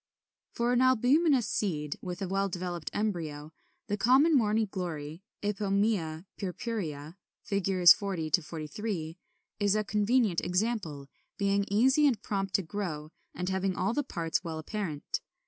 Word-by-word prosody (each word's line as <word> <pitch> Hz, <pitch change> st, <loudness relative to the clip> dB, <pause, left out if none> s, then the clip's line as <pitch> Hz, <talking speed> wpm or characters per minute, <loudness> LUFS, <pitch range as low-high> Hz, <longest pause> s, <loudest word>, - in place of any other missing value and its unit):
] -, -, -45 dB
33. -, -, -13 dB
For 240 Hz, +1 st, +2 dB
an 245 Hz, -, +3 dB
albuminous 260 Hz, +2 st, +4 dB
seed 150 Hz, -8 st, -1 dB
with 180 Hz, +2 st, -5 dB
a -, -, -2 dB
well 195 Hz, +1 st, 0 dB
developed 175 Hz, -4 st, -4 dB
embryo, 160 Hz, -7 st, -3 dB, 0.3 s
the 205 Hz, -, -2 dB
common 265 Hz, +9 st, +5 dB
Morning 220 Hz, -3 st, +2 dB
Glory 165 Hz, -4 st, -5 dB, 0.2 s
(Ipomœa 200 Hz, -5 st, 0 dB
purpurea, 180 Hz, -6 st, -4 dB, 0.3 s
Fig. 190 Hz, -2 st, 0 dB
40 175 Hz, -4 st, +5 dB
43) 165 Hz, +2 st, -5 dB, 0.4 s
is 205 Hz, -1 st, +3 dB
a 215 Hz, -, +1 dB
convenient 210 Hz, -2 st, +2 dB
example, 180 Hz, -7 st, -1 dB, 0.3 s
being 200 Hz, 0 st, +1 dB
easy 265 Hz, +8 st, +4 dB
and 240 Hz, -7 st, +1 dB
prompt 195 Hz, -3 st, -2 dB
to 195 Hz, -, +2 dB
grow, 160 Hz, -4 st, -4 dB, 0.2 s
and 180 Hz, +1 st, -2 dB
having 190 Hz, 0 st, 0 dB
all 190 Hz, +5 st, 0 dB
the 290 Hz, -, +1 dB
parts 170 Hz, -, -2 dB
well 165 Hz, -2 st, -4 dB
apparent. 160 Hz, -2 st, -4 dB
195 Hz, 145 wpm, -30 LUFS, 165-215 Hz, 0.4 s, common